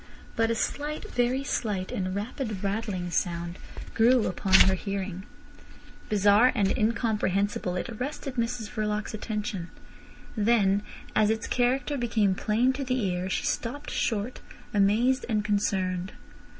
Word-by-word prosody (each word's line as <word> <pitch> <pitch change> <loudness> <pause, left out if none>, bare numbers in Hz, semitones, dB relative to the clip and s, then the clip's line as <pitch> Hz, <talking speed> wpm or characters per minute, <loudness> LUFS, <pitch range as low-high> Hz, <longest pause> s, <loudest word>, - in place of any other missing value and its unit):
But 225 0 +2
a 230 - +1
slight, 295 +6 -3
very 250 +2 +1
slight, 205 -9 -2
and 185 0 -2
rapid 215 -1 -4
rattling 195 -3 -2
sound 170 +1 -2 0.3
grew 235 +1 +4
upon 190 +1 +1
her 190 - +6
hearing. 195 -1 -4 0.8
Bizarre 210 +4 +5
and 200 -4 +2
incomprehensible, 210 -5 0
it 180 - -2
arrested 260 +3 -5
Mrs 235 -2 -2
Verloc's 215 -2 -2
attention. 210 -4 -4 0.7
Then 205 -3 +3 0.3
as 215 -1 +4
its 220 0 0
character 260 +3 +1
became 220 -5 +2
plain 230 +7 +1
to 275 +1 -3
the 255 0 0
ear 180 +1 -2
she - - -1
stopped 285 +6 -3
short, 225 +2 -1 0.3
amazed 220 +6 +3
and 210 -2 0
concerned. 190 -3 0
215 Hz, 130 wpm, -27 LUFS, 195-240 Hz, 0.8 s, her